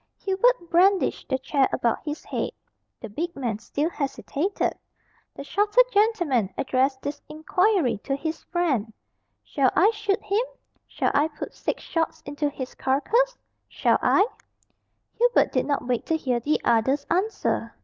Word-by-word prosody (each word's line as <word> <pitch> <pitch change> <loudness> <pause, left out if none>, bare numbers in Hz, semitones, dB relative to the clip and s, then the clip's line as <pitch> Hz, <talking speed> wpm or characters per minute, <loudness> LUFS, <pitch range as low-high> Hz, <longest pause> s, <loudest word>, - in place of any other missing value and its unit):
Hubert 390 0 +1
brandished 375 +3 +3
the 260 - +1
chair 270 +1 +1
about 235 -3 0
his 300 0 -5
head. - - -2 0.5
The 225 - -7
big 335 - -4
man 235 -6 -2
still 295 +8 -2
hesitated. 300 +5 -2 0.6
The - - -7
shorter 415 - +3
gentleman 350 - +2
addressed 265 0 0
this 285 +1 -4
inquiry 315 - +1
to 275 - 0
his 315 +3 -4
friend, 285 - 0 0.5
"Shall 270 -3 +2
I 395 +6 +5
shoot 425 -1 -1
him? 405 +3 +1 0.5
Shall - - -1
I 295 +2 +3
put 300 -2 -8
six - - -3
shots 325 -1 -2
into 290 +1 -2
his 260 -2 -7
carcass 470 - +1 0.3
shall - - +1
I?" 395 - +4 0.9
Hubert 485 +1 +4
did - - 0
not 285 -3 -1
wait 245 -2 -1
to 320 - +1
hear 255 -6 -1
the 290 +6 0
other's 265 +5 +2
answer. 385 +6 0
305 Hz, 150 wpm, -25 LUFS, 265-390 Hz, 0.9 s, I